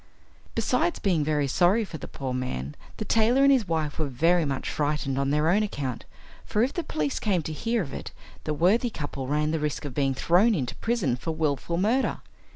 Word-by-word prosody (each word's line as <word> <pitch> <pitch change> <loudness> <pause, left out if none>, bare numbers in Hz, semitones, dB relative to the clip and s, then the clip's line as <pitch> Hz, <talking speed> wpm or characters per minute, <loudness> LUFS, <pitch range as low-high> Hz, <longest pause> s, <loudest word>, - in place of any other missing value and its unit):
Besides 345 - +1
being 175 -7 +1
very 150 -1 +1
sorry 185 - +3
for 160 -5 -8
the - - -7
poor 130 -2 -5
man, 100 - -3 0.2
the 215 - -4
tailor 230 +6 +3
and 275 - +6
his 250 -7 +3
wife 160 -3 -2
were 155 - 0
very 165 +6 +2
much 135 -2 -3
frightened 145 -2 -1
on 140 0 0
their 150 +2 +2
own 195 +6 +4
account, 140 - -3 0.4
for 210 - +1
if 260 - 0
the 345 - -2
police 150 - -2
came 190 -6 0
to 155 - -4
hear 230 +6 0
of 140 - -8
it - - -6 0.3
the 155 - -1
worthy 200 - +3
couple 145 - -5
ran 150 +2 +1
the 160 - 0
risk 150 0 -2
of 140 - -5
being 135 -1 +1
thrown 190 - +4
into 130 -7 -2
prison 220 - 0
for 160 +6 -4
wilful 155 +1 -1
murder. 225 +8 +1
155 Hz, 210 wpm, -26 LUFS, 140-210 Hz, 0.4 s, and